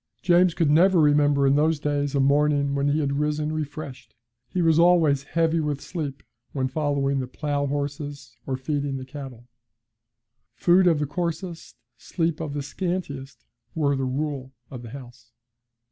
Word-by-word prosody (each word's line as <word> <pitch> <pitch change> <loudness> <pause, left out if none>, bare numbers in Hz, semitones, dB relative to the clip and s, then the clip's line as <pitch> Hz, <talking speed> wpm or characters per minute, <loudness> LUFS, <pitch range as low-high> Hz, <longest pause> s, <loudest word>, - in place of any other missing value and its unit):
James 175 -1 +4
could 160 -4 +2
never 180 +4 +5
remember 145 -2 +4
in 135 +1 +4
those 155 +1 +2
days 145 -1 -1
a - - +2
morning 140 +1 +2
when 140 0 0
he 145 +2 +1
had 140 -1 -1
risen 150 +1 -1
refreshed; 145 -6 -6 0.3
he 185 - -3
was 165 -2 +4
always 165 -5 +4
heavy 165 +3 0
with 150 -2 -1
sleep 145 -4 -5 0.3
when 130 -2 0
following 140 -1 0
the 130 - -3
plough 145 +1 -2
horses, 145 0 -4
or 130 -1 -1
feeding 140 0 -2
the 130 - -7
cattle. 130 -4 -9 1.1
Food 180 +1 +4
of 165 -3 +4
the 150 - -1
coarsest, 170 +2 -4 0.2
sleep 165 -3 -2
of 150 -3 -4
the 145 - -2
scantiest, 145 -5 -5 0.3
were 145 -3 +1
the 135 -1 -1
rule 135 0 -3 0.2
of 125 -3 -7
the 120 - -9
house. 120 -2 -12
145 Hz, 160 wpm, -24 LUFS, 140-160 Hz, 1.1 s, never